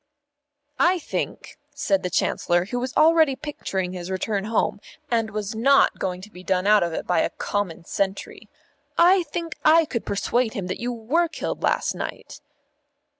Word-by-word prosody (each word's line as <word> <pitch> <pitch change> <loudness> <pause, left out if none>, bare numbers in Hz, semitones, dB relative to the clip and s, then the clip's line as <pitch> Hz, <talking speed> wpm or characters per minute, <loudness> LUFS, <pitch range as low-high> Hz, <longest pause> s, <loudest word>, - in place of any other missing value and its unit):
"I 360 +2 +4
think," 340 - -5 0.2
said 195 -9 +1
the 180 - -2
Chancellor, 175 0 +1
who 245 +5 -3
was 250 +1 -4
already 315 -3 +5
picturing 190 -11 -4
his 180 0 -6
return 195 +2 -2
home, 220 -1 0 0.3
and 225 -2 +1
was 215 0 -4
not 270 +5 +4
going 180 -1 -3
to 210 +3 -12
be 180 -1 -12
done 185 0 0
out 210 0 +5
of 170 - 0
it - - -4
by 175 -2 +2
a - - +1
common 195 -5 -3
sentry, 195 +2 -3 0.5
"I 360 +2 +6
think 335 -1 -5
I 325 +1 +6
could 235 -6 -3
persuade 230 +3 0
him 195 - -3
that 185 - -4
you 245 +1 -1
were 250 +10 0
killed - - -5
last - - +1
night." - - -7
220 Hz, 175 wpm, -24 LUFS, 190-290 Hz, 0.5 s, I